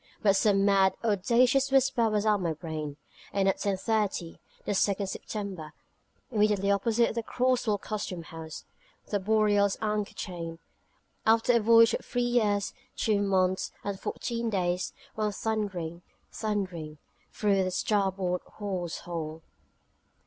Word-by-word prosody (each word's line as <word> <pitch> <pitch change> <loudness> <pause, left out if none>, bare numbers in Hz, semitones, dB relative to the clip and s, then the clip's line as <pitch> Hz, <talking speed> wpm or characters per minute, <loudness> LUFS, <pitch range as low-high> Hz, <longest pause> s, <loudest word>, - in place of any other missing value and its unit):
But 200 -2 +5
some 195 -1 +3
mad, 195 -1 +4
audacious 240 +6 +3
whisper 265 -4 +3
was 210 0 0
at 210 -1 +4
my 170 -4 -1
brain: 155 -2 -5 0.3
and 195 -1 +1
at 195 - +2
10.30, 200 -3 -1 0.3
the - - -1
2nd 200 0 +1
September, 190 -5 -5 0.6
immediately 210 -3 +2
opposite 225 +4 +2
the 230 - -1
Cross 250 +1 0
Wall 210 -1 +2
Custom 200 -4 -4
House, 160 -1 -9 0.5
the 205 - +1
Boreal's 205 -1 +3
anchor 210 -1 -2
chain, 170 -3 -5 0.7
after 225 +2 +4
a 235 - +5
voyage 230 +1 +6
of - - -2
three 245 0 -1
years, 215 -5 +1 0.2
two 210 -2 +1
months, 190 -2 +1
and 200 -1 -3
fourteen 235 -1 -3
days, 180 -3 0 0.2
ran 215 -1 0
thundering, 195 -6 -3 0.3
thundering, 185 -8 -3 0.3
through 200 -2 +2
the 185 - 0
starboard 190 -2 0 0.2
hawse 185 -5 -3
hole. 160 -2 -5
200 Hz, 135 wpm, -29 LUFS, 185-220 Hz, 0.7 s, voyage